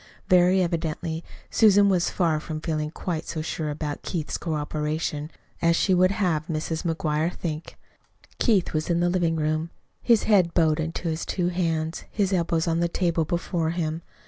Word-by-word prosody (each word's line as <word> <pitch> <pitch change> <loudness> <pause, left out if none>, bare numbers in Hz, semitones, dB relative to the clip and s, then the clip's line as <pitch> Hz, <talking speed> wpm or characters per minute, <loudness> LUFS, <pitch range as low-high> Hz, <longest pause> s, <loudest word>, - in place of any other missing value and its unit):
Very 180 +1 +5
evidently 165 -1 -2 0.3
Susan 205 -2 +5
was 180 -3 +2
far 165 -4 +1
from 155 0 -5
feeling 155 -1 -2
quite 165 0 -4
so 160 -2 -3
sure 155 -1 -3
about 150 0 -4
Keith's 160 -4 -3
cooperation 150 -1 -2 0.3
as 170 0 +4
she 190 - +2
would 185 0 +5
have 175 -6 0
Mrs. 160 0 -2
McGuire 160 -1 0
think. 160 -3 -5 0.6
Keith 205 -7 +2
was 155 +2 -1
in 170 0 +2
the 175 0 +2
living 175 -3 +1
room, 155 +1 -1 0.3
his 235 -3 +4
head 185 -6 +3
bowed 160 -2 +3
in 160 +1 -1
his 165 -2 -2
two 180 -2 -1
hands, 165 -2 -1
his 200 -2 0
elbows 170 -2 +1
on 165 0 +1
the 170 - +2
table 170 -2 0
before 170 0 -1
him. 165 -1 -2
165 Hz, 170 wpm, -25 LUFS, 155-175 Hz, 0.6 s, Very